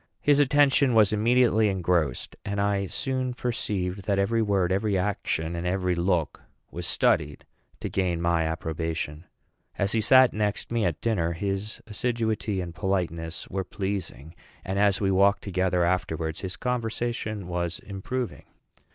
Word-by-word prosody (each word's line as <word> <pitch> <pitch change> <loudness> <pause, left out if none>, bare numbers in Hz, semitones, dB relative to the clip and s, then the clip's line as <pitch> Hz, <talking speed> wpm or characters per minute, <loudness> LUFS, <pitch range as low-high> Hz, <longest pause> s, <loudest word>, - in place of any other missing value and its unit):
His 145 -1 +3
attention 140 -2 +4
was 110 -2 +5
immediately 110 0 +3
engrossed; 85 -8 0
and 100 0 -3
I 100 -1 +1
soon 130 +2 -2
perceived 100 -6 -2
that 100 -2 +1
every 110 +4 +2
word, 100 -4 +1
every 100 +1 +1
action, 90 -4 -1
and 85 +1 -3
every 90 0 0
look 85 -3 0 0.3
was - - -5
studied 75 0 +1 0.4
to - - -2
gain 90 -3 0
my 85 -1 +1
approbation. 80 0 -3 0.5
As 100 0 +1
he 115 - +2
sat 130 +3 +6
next 105 +1 -1
me 115 -2 +1
at 85 -4 -1
dinner, 85 -8 0
his 100 +4 -3
assiduity 110 -3 -1
and 85 -2 -6
politeness 85 -4 -2
were 95 -1 -3
pleasing; 90 -6 -5 0.3
and 95 +1 -1
as 100 -1 +3
we 95 -2 +1
walked 100 +2 +3
together 95 -2 +1
afterwards, 80 -3 -1
his 95 -1 -4
conversation 115 -4 -2
was 85 -1 -2
improving. 110 +5 -5
100 Hz, 145 wpm, -26 LUFS, 85-110 Hz, 0.5 s, sat